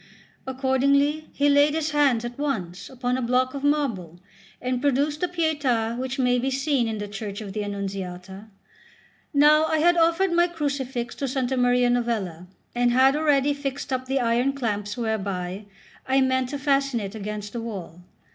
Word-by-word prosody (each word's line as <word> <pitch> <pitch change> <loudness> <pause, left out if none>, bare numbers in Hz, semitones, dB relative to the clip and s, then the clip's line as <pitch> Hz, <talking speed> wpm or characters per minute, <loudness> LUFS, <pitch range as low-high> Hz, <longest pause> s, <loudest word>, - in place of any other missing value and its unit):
Accordingly 280 +3 +1
he 285 - +1
laid 290 +1 +4
his 315 -1 -1
hands 275 -6 +2
at 240 +2 -7
once 200 -10 -3
upon 250 -1 -2
a - - -2
block 255 +1 +1
of 280 -1 -6
marble, 230 - -1 0.4
and 250 0 -2
produced 290 +2 +1
the 360 - +2
Pietà 290 -10 0
which 260 +2 -4
may 250 -1 +2
be 265 +2 -1
seen 270 -2 0
in 220 -1 -3
the 205 0 -5
church 205 0 -6
of 205 -3 -7
the 210 0 -2
Annunziata. 195 -1 -6 0.8
Now 300 +2 +5
I 315 0 +1
had 345 +3 +4
offered 335 +3 +3
my 345 +1 +4
crucifix 270 -7 -3
to 280 - -2
S. 265 +1 -4 0.2
Maria 245 -1 +3
Novella, 210 -8 -2 0.3
and 245 0 +2
had 260 +3 +4
already 290 -2 +2
fixed 280 0 -4
up 255 0 -2
the 270 +1 0
iron 245 +3 +1
clamps 210 -5 -3
whereby 200 -4 -3 0.4
I 265 +1 +3
meant 260 -1 +1
to 285 - -3
fasten 275 -3 +1
it 200 -1 -5
against 210 -1 -6
the 235 - -4
wall. 185 -7 -7
255 Hz, 175 wpm, -24 LUFS, 220-285 Hz, 0.8 s, Now